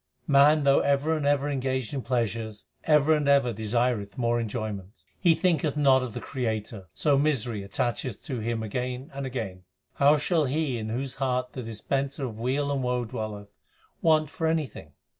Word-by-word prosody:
Man 145 Hz, +1 st, +5 dB
though 140 Hz, 0 st, +5 dB
ever 140 Hz, +3 st, +2 dB
and 150 Hz, -2 st, -1 dB
ever 145 Hz, 0 st, +2 dB
engaged 130 Hz, -3 st, -2 dB
in 135 Hz, -, -2 dB
pleasures, 115 Hz, -3 st, -2 dB, 0.2 s
ever 150 Hz, 0 st, +5 dB
and 150 Hz, -2 st, +1 dB
ever 140 Hz, -4 st, +4 dB
desireth 110 Hz, -1 st, -1 dB
more 120 Hz, -1 st, +1 dB
enjoyment. 105 Hz, -4 st, -4 dB, 0.3 s
He 170 Hz, -3 st, +4 dB
thinketh 160 Hz, -5 st, +1 dB
not 135 Hz, -3 st, +5 dB
of 125 Hz, -4 st, -5 dB
the -, -, -3 dB
Creator, 110 Hz, -6 st, -4 dB
so 145 Hz, -2 st, +3 dB
misery 125 Hz, -8 st, 0 dB
attacheth 115 Hz, +3 st, -3 dB
to 130 Hz, -4 st, -4 dB
him 110 Hz, 0 st, -2 dB
again 125 Hz, +4 st, -4 dB
and 140 Hz, 0 st, -4 dB
again. 110 Hz, -8 st, -5 dB, 0.4 s
How 145 Hz, +2 st, +5 dB
shall 150 Hz, +1 st, +1 dB
he 135 Hz, -2 st, -1 dB
in 110 Hz, 0 st, -4 dB
whose 130 Hz, +4 st, -3 dB
heart 125 Hz, -1 st, 0 dB
the 130 Hz, -, -5 dB
Dispenser 135 Hz, +5 st, -3 dB
ot 115 Hz, -, -7 dB
weal 130 Hz, +6 st, -1 dB
and 140 Hz, -1 st, 0 dB
woe 125 Hz, -1 st, 0 dB
I 115 Hz, -, -9 dB
dwelleth, 110 Hz, -4 st, -5 dB, 0.5 s
want 155 Hz, -2 st, +3 dB
for 160 Hz, -, -1 dB
anything 150 Hz, -, -2 dB
130 Hz, 180 wpm, -27 LUFS, 115-145 Hz, 0.5 s, Man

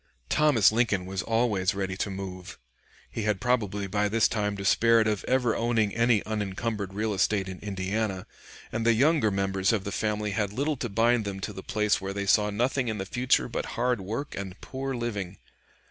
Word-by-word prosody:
Thomas 150 Hz, -10 st, +4 dB
Lincoln 110 Hz, -5 st, +1 dB
was 95 Hz, 0 st, -3 dB
always 110 Hz, -5 st, +1 dB
ready 95 Hz, -1 st, -2 dB
to 105 Hz, -, -2 dB
move. 95 Hz, -2 st, -7 dB, 0.5 s
He -, -, -4 dB
had 105 Hz, -2 st, 0 dB
probably 105 Hz, -5 st, 0 dB
by 105 Hz, +2 st, 0 dB
this 115 Hz, +1 st, +3 dB
time 105 Hz, -2 st, -1 dB
despaired 110 Hz, +3 st, +3 dB
of 105 Hz, -2 st, -1 dB
ever 125 Hz, -3 st, +2 dB
owning 115 Hz, -3 st, +1 dB
any 115 Hz, -2 st, +2 dB
unencumbered 105 Hz, -1 st, -3 dB
real 110 Hz, +1 st, -1 dB
estate 95 Hz, 0 st, +1 dB
in 95 Hz, -1 st, -7 dB
Indiana, 95 Hz, 0 st, -2 dB, 0.5 s
and 110 Hz, +1 st, -2 dB
the 115 Hz, 0 st, +4 dB
younger 140 Hz, 0 st, +3 dB
members 95 Hz, -1 st, +1 dB
of 110 Hz, -4 st, 0 dB
the 100 Hz, -, -4 dB
family 105 Hz, -1 st, -1 dB
had 100 Hz, 0 st, -1 dB
little 145 Hz, +6 st, 0 dB
to 120 Hz, -, -3 dB
bind 115 Hz, +3 st, +2 dB
them 100 Hz, -1 st, -4 dB
to -, -, -4 dB
the 95 Hz, -, -7 dB
place 105 Hz, +1 st, 0 dB
where 95 Hz, 0 st, -4 dB
they 100 Hz, 0 st, -3 dB
saw 105 Hz, +1 st, +3 dB
nothing 125 Hz, +5 st, 0 dB
in 110 Hz, -1 st, -2 dB
the 95 Hz, -, -4 dB
future 125 Hz, +6 st, +1 dB
but 120 Hz, -, -3 dB
hard 120 Hz, -2 st, +1 dB
work 115 Hz, +10 st, -4 dB
and 95 Hz, -1 st, -6 dB
poor 135 Hz, 0 st, -4 dB
living. 100 Hz, -6 st, -4 dB
105 Hz, 190 wpm, -27 LUFS, 100-115 Hz, 0.5 s, Thomas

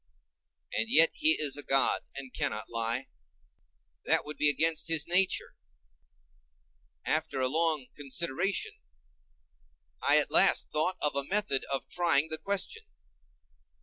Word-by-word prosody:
And 110 Hz, +1 st, -2 dB
yet 165 Hz, +5 st, +6 dB
he 155 Hz, -, +3 dB
is 145 Hz, -3 st, +1 dB
a 145 Hz, -, -1 dB
god 135 Hz, -1 st, +3 dB
and 135 Hz, -2 st, -9 dB
cannot 105 Hz, +1 st, -3 dB
lie; 115 Hz, +3 st, -1 dB, 1.0 s
that -, -, 0 dB
would 150 Hz, +1 st, -8 dB
be 150 Hz, -, +3 dB
against 160 Hz, +2 st, +1 dB
his 160 Hz, -2 st, +1 dB
nature. 180 Hz, +2 st, +1 dB, 1.5 s
After 155 Hz, -3 st, -2 dB
a 130 Hz, -, 0 dB
long 155 Hz, -1 st, 0 dB
consideration, 170 Hz, +6 st, -2 dB, 1.2 s
I -, -, +3 dB
at -, -, 0 dB
last -, -, +4 dB
thought 155 Hz, +5 st, -2 dB
of 150 Hz, -2 st, 0 dB
a 140 Hz, -, 0 dB
method 200 Hz, -9 st, 0 dB
of 135 Hz, -, -3 dB
trying 160 Hz, -4 st, +2 dB
the 160 Hz, 0 st, -5 dB
question. 200 Hz, -, -3 dB
150 Hz, 130 wpm, -28 LUFS, 135-170 Hz, 1.5 s, yet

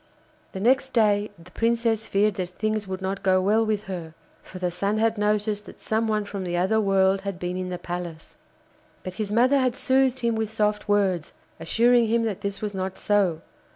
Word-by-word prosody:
The 190 Hz, -, -5 dB
next 260 Hz, +5 st, +2 dB
day 210 Hz, -2 st, +3 dB
the 170 Hz, +2 st, -16 dB
Princess 230 Hz, -1 st, 0 dB
feared 205 Hz, +1 st, +2 dB
that 185 Hz, -3 st, -4 dB
things 215 Hz, +2 st, -2 dB
would 190 Hz, 0 st, -5 dB
not 195 Hz, +1 st, -2 dB
go 185 Hz, -1 st, +3 dB
well 210 Hz, +4 st, +3 dB
with 215 Hz, -2 st, -1 dB
her, 175 Hz, -5 st, -7 dB, 0.3 s
for 185 Hz, -, -11 dB
the 180 Hz, -1 st, -1 dB
Sun 200 Hz, +4 st, -1 dB
had 225 Hz, 0 st, +2 dB
noticed 210 Hz, 0 st, 0 dB
that -, -, -12 dB
some 220 Hz, +1 st, -1 dB
one 215 Hz, -1 st, 0 dB
from 200 Hz, -1 st, -5 dB
the 175 Hz, -1 st, -2 dB
other 190 Hz, +5 st, +2 dB
world 195 Hz, -1 st, +3 dB
had 195 Hz, -2 st, -4 dB
been 180 Hz, 0 st, -4 dB
in 185 Hz, 0 st, -3 dB
the 180 Hz, -, -3 dB
palace. 175 Hz, -2 st, -7 dB, 0.7 s
But 185 Hz, -, -6 dB
his 205 Hz, -1 st, -3 dB
mother 255 Hz, +5 st, +4 dB
had 255 Hz, -2 st, +1 dB
soothed 260 Hz, -1 st, +2 dB
him 235 Hz, -1 st, +1 dB
with 220 Hz, -1 st, -1 dB
soft 210 Hz, -1 st, -1 dB
words, 190 Hz, -6 st, +1 dB, 0.3 s
assuring 235 Hz, +8 st, +3 dB
him 230 Hz, +1 st, +2 dB
that 210 Hz, -3 st, -3 dB
this 200 Hz, -1 st, -4 dB
was 210 Hz, -1 st, -3 dB
not 190 Hz, 0 st, -4 dB
so. 195 Hz, -6 st, +1 dB
205 Hz, 205 wpm, -25 LUFS, 185-220 Hz, 0.7 s, mother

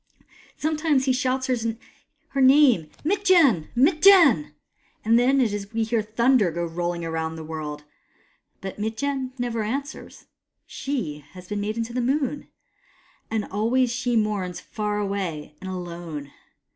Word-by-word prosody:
Some 310 Hz, +1 st, -1 dB
times 300 Hz, -4 st, +2 dB
he 260 Hz, -, +3 dB
shouts 255 Hz, +1 st, 0 dB
her 260 Hz, +5 st, -5 dB
name 260 Hz, -, +5 dB
— -, -, -28 dB
" -, -, -26 dB
Mitjen! 345 Hz, -, +4 dB
Mitjen! 310 Hz, -, +5 dB, 0.2 s
" -, -, -43 dB
— -, -, -37 dB
and 230 Hz, +2 st, +5 dB
it 265 Hz, +3 st, +3 dB
is 225 Hz, -, 0 dB
then 205 Hz, 0 st, -2 dB
that 200 Hz, +3 st, -13 dB
we 225 Hz, -, +1 dB
hear 225 Hz, 0 st, 0 dB
Thunder 225 Hz, 0 st, +2 dB
go 170 Hz, +1 st, -3 dB
rolling 170 Hz, +1 st, -3 dB
round 160 Hz, 0 st, -3 dB
the 160 Hz, -, -7 dB
world. 155 Hz, -2 st, -6 dB, 0.8 s
But 190 Hz, +1 st, -7 dB
Mitjen 255 Hz, +5 st, -2 dB
never 240 Hz, -2 st, -2 dB
answers. 275 Hz, +7 st, -5 dB, 0.4 s
She 205 Hz, -, -4 dB
has 180 Hz, -1 st, -12 dB
been 205 Hz, 0 st, -3 dB
made 210 Hz, +1 st, -2 dB
the 235 Hz, +2 st, -2 dB
Moon, 275 Hz, +2 st, -1 dB, 0.8 s
and 220 Hz, -2 st, -1 dB
always 235 Hz, +5 st, +1 dB
she 245 Hz, 0 st, -1 dB
mourns 200 Hz, -5 st, -1 dB
far 210 Hz, +1 st, -3 dB
away 195 Hz, -7 st, -3 dB
and 190 Hz, -, -6 dB
alone. 170 Hz, -5 st, -6 dB
225 Hz, 155 wpm, -24 LUFS, 180-265 Hz, 0.8 s, name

